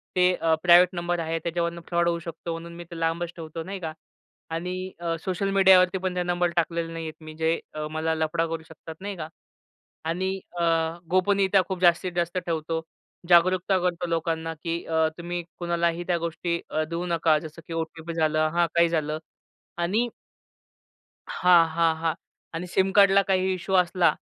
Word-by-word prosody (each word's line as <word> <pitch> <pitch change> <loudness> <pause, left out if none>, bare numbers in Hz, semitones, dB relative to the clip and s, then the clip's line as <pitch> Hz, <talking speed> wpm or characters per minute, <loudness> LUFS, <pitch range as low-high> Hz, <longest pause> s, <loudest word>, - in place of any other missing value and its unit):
ते 180 0 +4
अ, 165 -2 +1
private 175 0 +7
number 175 0 -1
आहेत, 165 0 -2
त्याच्यावरून 170 0 -2
फ्रॉड 170 0 +1
होऊ 170 - -1
शकतो 170 0 -6
म्हणून 165 +1 -6
मी 175 - -8
ते 170 - -7
लांबच 165 +1 -1
ठेवतो, 165 0 -6
नाही 195 +3 -6
का? 160 -3 -5 0.6
आणि 180 +3 -4
अ, 165 -1 -1
सोशल 190 +1 -1
मीडियावरती 190 -1 +6
पण 185 -1 -3
ते 180 - 0
नंबर 175 0 +1
टाकलेले 170 0 0
नाही 165 -1 -5
आहेत 155 0 -9
मी 155 0 -9
जे 160 +1 +1 0.3
मला 160 +1 -1
अ, - - +1
लफडा 160 +1 0
करू 165 0 -4
शकतात 160 0 -11
नाही 200 0 -4
का? 155 - -5 0.8
आणि 185 +4 -1 0.2
अ, - - +2 0.5
गोपनीयता 195 +1 +3
खूप 185 -1 -3
जास्तीत 175 0 +3
जास्त 175 +1 0
ठेवतो. 165 -2 -2 0.5
जागरूकता 185 +2 +4
करतो 175 -1 -1
लोकांना 165 0 -1
की 170 0 -2
अ, 160 -1 +2
तुम्ही 175 0 -4 0.2
कुणालाही 170 0 0
त्या 175 - +2
गोष्टी 170 +1 -2
अ, 155 - 0
देऊ 170 +1 -2
नका, 165 -2 +3
जसं 160 +1 -10
की - - -8
ओ-टी-पी 165 0 -4
झाल 155 -1 +1
हां. 155 +2 +2
काही 170 0 +5
झालं. 155 -2 -1 0.6
आणि 210 +8 +1 1.2
हां, 175 -2 +5
हां, 165 0 +2
हां. 160 0 -1 0.4
आणि 165 +2 -4
सिम 190 +2 +1
कार्डला 200 -1 +6
काही 190 -1 +1
इश्यू 185 +1 -3
असला 175 -3 +3
170 Hz, 175 wpm, -26 LUFS, 165-180 Hz, 1.2 s, private